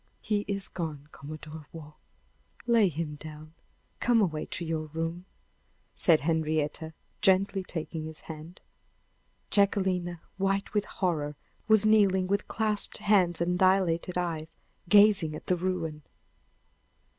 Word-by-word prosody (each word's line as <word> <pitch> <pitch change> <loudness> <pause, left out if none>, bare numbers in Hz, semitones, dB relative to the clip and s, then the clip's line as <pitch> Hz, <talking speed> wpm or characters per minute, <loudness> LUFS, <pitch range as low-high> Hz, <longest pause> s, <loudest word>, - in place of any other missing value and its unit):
"He 205 -1 -1
is 200 -1 -1
gone, 155 -5 -5
Commodore 155 +1 -9
Waugh; 150 -2 -10 0.7
lay 230 -5 +4
him 150 -1 -4
down; 155 +1 -10 0.5
come 240 -2 +3
away 160 -7 0
to 170 - -4
your 160 -1 -2
room," 165 +3 -4 0.7
said 165 -3 +3
Henrietta, 160 0 -1 0.3
gently 195 -1 +3
taking 160 -2 -5
his 160 0 -8
hand. 160 +2 -10 0.9
Jacquelina, 185 -4 +1 0.2
white 195 +1 0
with 210 -1 +1
horror, 150 -6 -2 0.3
was 220 -1 +6
kneeling 200 -4 +4
with 200 +2 -1
clasped 215 -2 0
hands 185 -5 +2
and 180 +1 0
dilated 185 -2 +2
eyes, 165 -3 -2 0.4
gazing 200 -6 +5
at - - -9
the 180 - +2
ruin. 170 -4 -2
175 Hz, 120 wpm, -29 LUFS, 155-195 Hz, 0.9 s, was